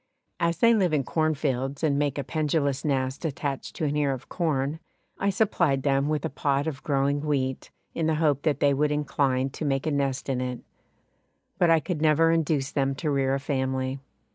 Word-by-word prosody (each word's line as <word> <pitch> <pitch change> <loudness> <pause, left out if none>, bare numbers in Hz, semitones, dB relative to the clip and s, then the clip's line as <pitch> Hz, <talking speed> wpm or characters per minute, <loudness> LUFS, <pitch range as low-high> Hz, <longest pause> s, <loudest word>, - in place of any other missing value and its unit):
As 170 -1 +1
they 230 +5 +5
live 185 -7 +2
in 145 -3 +2
cornfields 140 -2 -1
and 145 -2 +2
make 145 -1 0
a 140 - -1
pendulous 145 -3 0
nest 135 -1 -1
attached 140 -3 -3
to 160 - -2
an 145 0 0
ear 145 -2 +1
of 130 0 -9
corn, 155 -3 -1 0.4
I 200 - +1
supplied 175 -9 +1
them 140 0 +2
with 150 -2 -1
a - - -1
pot 140 0 0
of 145 -4 -4
growing 140 0 0
wheat, 135 -3 -1 0.2
in 165 -1 -1
the 160 - +2
hope 150 -3 +2
that 150 -2 0
they 145 -1 +4
would 150 +2 +1
incline 140 -2 0
to 155 - -6
make 135 -2 0
a 155 - 0
nest 140 -2 -1
in 130 -2 -1
it; 125 -1 -4 1.0
but 175 - +4
I 165 -1 +5
could 160 -1 -4
never 160 +1 +4
induce 155 -4 0
them 135 -1 0
to 150 +3 -2
rear 135 -1 +1
a - - -2
family. 130 -1 -2
145 Hz, 200 wpm, -26 LUFS, 135-155 Hz, 1.0 s, they